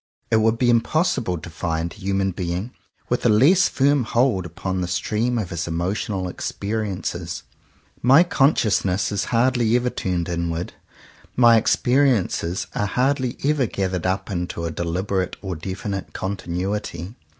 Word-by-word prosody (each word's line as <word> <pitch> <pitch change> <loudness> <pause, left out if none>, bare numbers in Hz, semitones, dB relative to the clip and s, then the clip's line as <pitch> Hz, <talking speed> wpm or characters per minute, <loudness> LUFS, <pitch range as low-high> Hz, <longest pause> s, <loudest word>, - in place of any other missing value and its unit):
It 110 - +5
would 110 +1 +3
be 120 0 +3
impossible 120 - +1
to 85 - -9
find 80 +1 -2
a - - -15
human 95 -1 -1
being 90 +5 -3 0.4
with 120 - -1
a 120 - +4
less 150 - +5
firm 140 0 +2
hold 115 -5 +1
upon 90 +2 -3
the 90 - -2
stream 110 +7 0
of 100 -6 -3
his 85 -1 -3
emotional 95 +3 -2
experiences. 100 +2 -4 0.6
My 135 +7 +7
consciousness 105 - +2
is 100 - -1
hardly 120 -1 +2
ever 125 0 +1
turned 90 -3 -2
inward: 85 -1 -3 0.6
my 120 -2 +6
exper 130 +5 +3
iences 95 -6 -1
are 105 - -1
hardly 130 +2 0
ever 145 -4 +2
gathered 95 -3 -2
up 95 +1 -2
into 85 -2 -3
a 85 - -2
de 85 - -3
liberate 95 +2 -1
or 95 -2 -4
definite 95 +3 -5
continuity. 95 0 -3
100 Hz, 150 wpm, -22 LUFS, 90-120 Hz, 0.6 s, My